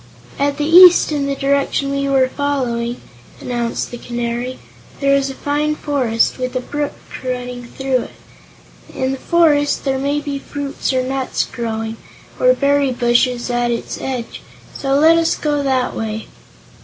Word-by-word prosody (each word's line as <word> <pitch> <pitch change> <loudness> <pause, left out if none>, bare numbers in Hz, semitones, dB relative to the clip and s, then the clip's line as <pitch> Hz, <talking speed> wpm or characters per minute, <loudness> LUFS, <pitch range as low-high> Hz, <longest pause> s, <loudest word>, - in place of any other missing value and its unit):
"At 285 0 +1
the 295 - -1
east 350 +1 +8
in 285 -2 -1
the 280 - -1
direction 275 0 0
we 275 0 -1
were 265 -1 +3
following," 250 -4 -2 0.4
announced 240 -2 -3
the 240 - -7
Canary, 240 +1 -3 0.4
"there 275 0 +3
is 275 0 +2
a 270 - -7
fine 295 +2 -1
forest, 255 -6 0
with 255 0 -3
a - - +1
brook 290 +3 -3 0.3
running 250 -1 -4
through 260 0 -1
it. - - -20 0.8
In 260 0 -1
the 270 - -4
forest 295 -4 +2
there 265 -1 0
may 285 +2 0
be 285 -1 -4
fruits 280 0 -4
or 260 -1 +1
nuts 265 0 -1
growing, 225 -1 -4 0.4
or - - +5
berry 280 -1 +2
bushes 240 0 +1
at 240 0 0
its 235 -1 -3
edge, 250 -3 -5 0.3
so 270 0 0
let 320 +3 +5
us 330 - +1
go 295 -1 -1
that 260 -2 0
way." 220 -1 -4
270 Hz, 160 wpm, -18 LUFS, 245-285 Hz, 0.8 s, east